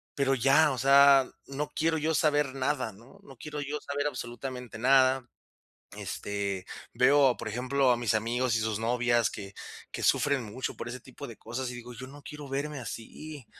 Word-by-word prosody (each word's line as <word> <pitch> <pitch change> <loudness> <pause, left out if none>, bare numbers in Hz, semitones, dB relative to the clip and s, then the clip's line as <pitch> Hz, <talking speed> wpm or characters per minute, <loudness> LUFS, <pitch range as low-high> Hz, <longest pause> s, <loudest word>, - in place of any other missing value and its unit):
pero 135 -1 +2
ya, 140 +4 +5
o 130 - -3
sea, 140 0 +6 0.2
no 145 +2 -4
quiero 160 0 +1
yo 160 +1 0
saber 150 -3 +2
nada, 135 -4 -1
¿no?, 115 +7 -17
no 135 - -13
quiero 150 +4 -6
yo 145 +1 -3
saber 145 0 -3
absolutamente 125 -2 -6
nada. 130 +1 +4 0.7
Este, 100 -2 -4 0.3
veo, 135 -1 +5
por - - -7
ejemplo, 130 +3 +2
a - - +2
mis 120 -2 0
amigos 120 +2 +1
y - - 0
sus 110 -1 -1
novias 120 -1 +2
que 100 -2 -8 0.4
que - - -5
sufren 140 -2 +2
mucho 110 +5 -4
por - - -6
ese 125 +2 -6
tipo 130 +3 -10
de 115 - -10
cosas, 125 +3 -4
y - - -7
digo, 120 0 -9
yo 130 +3 -8
no 145 +2 -13
quiero 150 -2 -8
verme 140 +1 -3
así, 130 +5 -8
130 Hz, 185 wpm, -29 LUFS, 120-140 Hz, 0.7 s, sea